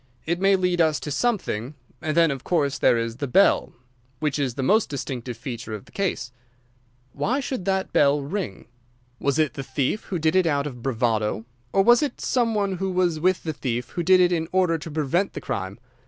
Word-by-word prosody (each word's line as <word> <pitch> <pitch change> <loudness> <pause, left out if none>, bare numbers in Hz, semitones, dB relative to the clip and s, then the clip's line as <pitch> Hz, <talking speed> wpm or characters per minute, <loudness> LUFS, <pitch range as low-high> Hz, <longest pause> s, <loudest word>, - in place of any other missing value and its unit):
It 170 +2 -1
may 195 0 +5
lead 180 -2 +1
us 155 -2 +2
to 150 - -5
something. 145 - -1 0.3
And 155 +1 -2
then, 165 -3 +5
of 135 -2 -5
course, 145 -6 0
there 120 - +4
is 115 0 -3
the 140 - -3
bell—which 125 -2 0
is 130 -4 -1
the 135 - -2
most 215 - +3
distinctive 130 -4 -5
feature 120 -3 -6
of 105 - -10
the - - -19
case. 175 -11 -2 0.8
Why 205 - 0
should 260 -8 -4
the 190 -1 0
bell 145 0 +4
ring? 145 - -4 0.5
Was 140 0 0
it 155 -3 +2
the 140 - -5
thief 135 +8 -2
who 185 - -3
did 160 +1 +1
it 185 -2 +4
out 145 -2 +1
of 125 -5 -7
bravado? 110 -3 0 0.3
Or 195 - +3
was 240 +3 +6
it 290 -4 -2
some 235 -3 +1
one 200 -3 0
who 190 +1 -2
was 180 -3 +1
with 185 +2 +1
the 160 - -3
thief 125 -4 -3
who 175 - -3
did 185 +2 +5
it 180 -1 +4
in 165 -2 0
order 180 -3 +2
to 160 - -7
prevent 155 +5 0
the - - -6
crime? 95 +1 -4
155 Hz, 210 wpm, -24 LUFS, 130-185 Hz, 0.8 s, was